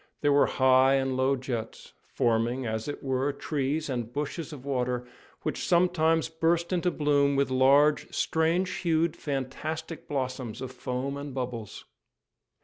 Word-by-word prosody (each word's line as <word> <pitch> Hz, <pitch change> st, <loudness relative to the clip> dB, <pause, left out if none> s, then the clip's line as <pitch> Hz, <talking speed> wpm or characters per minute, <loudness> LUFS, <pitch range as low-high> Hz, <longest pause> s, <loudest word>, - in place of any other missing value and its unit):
There 145 Hz, -1 st, +3 dB
were 140 Hz, -, +5 dB
high 130 Hz, 0 st, +4 dB
and 135 Hz, -1 st, 0 dB
low 130 Hz, +1 st, +2 dB
jets, 125 Hz, -4 st, -6 dB, 0.2 s
forming, 120 Hz, +2 st, +1 dB
as 110 Hz, +1 st, -3 dB
it 145 Hz, -, -5 dB
were, 135 Hz, +1 st, 0 dB
trees 145 Hz, +1 st, -2 dB
and 120 Hz, -4 st, -3 dB
bushes 150 Hz, +4 st, -4 dB
of 140 Hz, -3 st, -10 dB
water, 125 Hz, -2 st, -1 dB, 0.4 s
which -, -, -2 dB
sometimes 165 Hz, -2 st, +3 dB
burst 165 Hz, +2 st, 0 dB
into 180 Hz, 0 st, +1 dB
bloom 145 Hz, -3 st, +2 dB
with 140 Hz, -1 st, +1 dB
large, 140 Hz, +3 st, +4 dB
strange 170 Hz, +3 st, 0 dB
hued, 165 Hz, -1 st, +1 dB
fantastic 155 Hz, +4 st, -4 dB
blossoms 130 Hz, -5 st, -3 dB
of 130 Hz, 0 st, -5 dB
foam 130 Hz, +2 st, -4 dB
and 140 Hz, -1 st, -7 dB
bubbles. 120 Hz, -5 st, -5 dB
140 Hz, 145 wpm, -28 LUFS, 130-160 Hz, 0.4 s, were